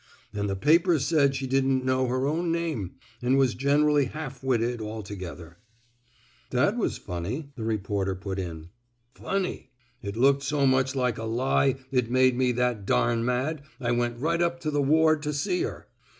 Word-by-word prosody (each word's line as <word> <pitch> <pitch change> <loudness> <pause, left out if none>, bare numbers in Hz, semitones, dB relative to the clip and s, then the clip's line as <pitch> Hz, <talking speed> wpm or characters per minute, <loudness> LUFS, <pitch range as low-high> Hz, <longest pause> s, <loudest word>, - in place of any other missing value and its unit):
An' 105 -1 -2
the 100 - -1
papers 160 - +3
said 140 -4 +3
she 135 - -3
didn't 130 0 +1
know 130 0 +1
her 130 +2 0
own 165 +4 0
name, 160 - -2 0.3
an' 125 +2 +2
was 130 -2 +3
gen 140 +3 +2
'rally 150 -2 +3
half 135 -2 -7
witted 120 -2 0
alto 105 -2 -6
gether 85 -2 -9 0.3
— 120 0 -38
" - - -32
That - - +2
was - - -1
funny," 105 - -5
the 115 - -6
reporter 100 -3 -1
put 95 +1 -5
in. 85 -3 -6 0.4
Funny 195 -2 -3 0.3
I - - -6
It 100 +2 -4
looked 140 +3 +4
so 140 0 0
much 130 0 +2
like 125 -3 0
a 115 - -4
fie 130 +3 +2 0.2
it 125 -3 +1
made 130 0 +4
me 125 0 +2
that 125 -3 0
dam 115 -1 +2
mad 130 +5 -1 0.2
I 120 -2 -1
went 120 0 0
right 165 +6 0
up 170 0 0
to 155 - -2
the 145 -1 +1
ward 155 +2 +3
to 150 0 -2
see 345 - -1
her. 385 - -5
130 Hz, 195 wpm, -26 LUFS, 115-145 Hz, 0.4 s, looked